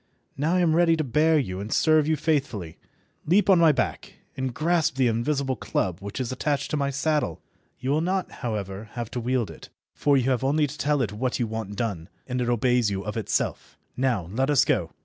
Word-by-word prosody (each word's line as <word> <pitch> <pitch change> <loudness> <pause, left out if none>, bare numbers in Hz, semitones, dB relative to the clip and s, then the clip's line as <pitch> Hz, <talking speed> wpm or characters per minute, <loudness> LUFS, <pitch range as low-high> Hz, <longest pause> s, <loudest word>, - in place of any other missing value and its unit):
Now 155 +6 0
I 180 - +3
am 160 -3 +3
ready 165 -1 +4
to 155 - 0
bear 155 +4 +3
you 95 -10 -2
and 105 +3 -6
serve 155 -2 +3
you 160 - +2
faithfully. 135 - -2 0.5
Leap 195 +4 +4
on 185 - +6
my 165 -2 +6
back 145 - -2 0.2
and 130 -1 -2
grasp 160 +3 +1
the 135 -1 +2
invisible 130 +4 0
club 95 -5 -2
which 100 +5 -6
is 130 -2 -2
attached 140 +2 -1
to - - +1
my 140 -1 0
saddle. 140 - 0 0.4
You 130 +2 -2
will 150 +2 +2
not, 185 +2 -1
however, 105 -3 -4
have 120 -2 -5
to 125 - -3
wield 120 -2 -1
it, - - -13 0.2
for 145 -1 +2
you 130 0 +1
have 125 -1 0
only 150 +3 +2
to 145 +1 -6
tell 145 -2 +1
it 105 -3 -3
what 125 +4 -1
you 120 - +1
want 110 -2 -5
done 100 -6 -3 0.2
and 125 -1 -2
it 120 - 0
obeys 120 -1 +2
you 95 -1 -3
of 105 - -4
itself. 110 -3 -2 0.2
Now 125 -9 0
let 135 +4 +1
us 145 -3 +4
go. - - +1
130 Hz, 220 wpm, -25 LUFS, 110-150 Hz, 0.5 s, on